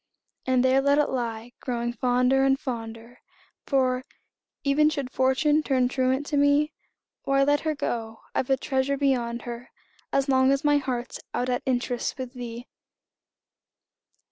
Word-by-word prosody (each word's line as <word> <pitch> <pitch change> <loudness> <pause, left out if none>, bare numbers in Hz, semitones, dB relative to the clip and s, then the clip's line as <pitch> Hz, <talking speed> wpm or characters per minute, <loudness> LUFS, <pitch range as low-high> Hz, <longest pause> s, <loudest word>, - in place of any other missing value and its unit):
And 255 -1 +3
there 260 +1 +4
let 280 +1 +3
it 295 - +2
lie, 235 -2 -3
growing 240 -1 -2
fonder 250 +2 +2
and, 270 0 +3
fonder 230 -1 -6 0.5
For, 255 -2 +1 0.6
even 295 +2 +4
should 280 -4 -4
Fortune 295 +4 +2
turn 260 -4 +1
truant 260 +1 0
to 290 -1 -1
me, 285 +2 +3 0.5
Why, 275 0 +2
let 290 +1 +3
her 310 0 -2
go 225 -5 -4
I've 255 - -1
a 270 - +3
treasure 270 0 -1
beyond 245 -4 0
her, 240 +1 -7 0.4
As 275 0 +1
long 260 0 +4
as 275 0 +1
my 290 -1 +4
heart's 250 -3 -3 0.2
out 250 +1 -1
at 245 - 0
interest 245 -1 -1
With 255 -1 -6
thee! 240 -1 -7
260 Hz, 150 wpm, -26 LUFS, 245-275 Hz, 0.6 s, there